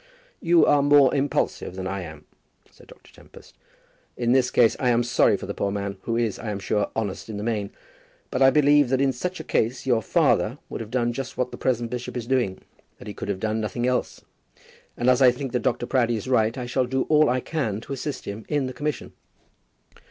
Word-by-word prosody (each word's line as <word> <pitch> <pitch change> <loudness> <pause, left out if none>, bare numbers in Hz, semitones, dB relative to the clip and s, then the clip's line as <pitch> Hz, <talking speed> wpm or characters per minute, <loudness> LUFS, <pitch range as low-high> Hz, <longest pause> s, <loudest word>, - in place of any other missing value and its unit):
"You 170 0 +4
are 145 -1 +4
more 145 -2 +5
impulsive 140 -9 -1
than 95 0 -5
I 95 0 -3
am," 80 -3 -10 0.5
said - - -19
Dr. - - -18
Tempest. - - -17 0.6
"In 120 -1 0
this 125 -1 +3
case 115 -2 +4
I 125 - +1
am 120 0 +3
sorry 120 +1 +3
for - - -8
the - - -4
poor 100 - -2
man, 100 -1 -4
who 115 0 -2
is, 115 -4 -1
I 110 - -5
am 105 - -3
sure, 100 +1 -1
honest 110 -1 -4
in 105 - -5
the 105 - -4
main. 105 -3 -2 0.6
But 125 - -2
I 135 - +8
believe 145 -1 +4
that 130 0 +1
in 135 -1 +2
such 180 +8 -4
a - - -5
case 125 -2 -1
your 120 -4 +2
father - - +1
would - - -5
have 110 - -7
done 120 -1 0
just 130 +1 -6
what 125 0 -1
the - - -6
present 120 -2 -1
bishop 125 0 -5
is 120 - -4
doing; 120 -7 0 0.4
that - - -12
he 105 - -6
could - - -7
have 95 -2 -2
done 110 +1 -1
nothing 120 +3 -2
else; 125 0 -1 0.8
and 120 - -1
as 125 +1 +4
I 130 - +8
think 125 +1 -4
that 125 - 0
Dr. 120 - -1
Proudie 120 -3 +1
is 110 - -7
right 115 -2 +2
I 125 - -4
shall 125 +1 0
do 130 +1 0
all 155 -1 +4
that 125 - +2
I 130 - 0
can 125 -8 -3
to 140 - -7
assist 135 0 -5
him 100 +2 -6
in 145 -3 0
the 130 - -5
commission." 145 +3 -4
125 Hz, 235 wpm, -24 LUFS, 110-135 Hz, 0.8 s, I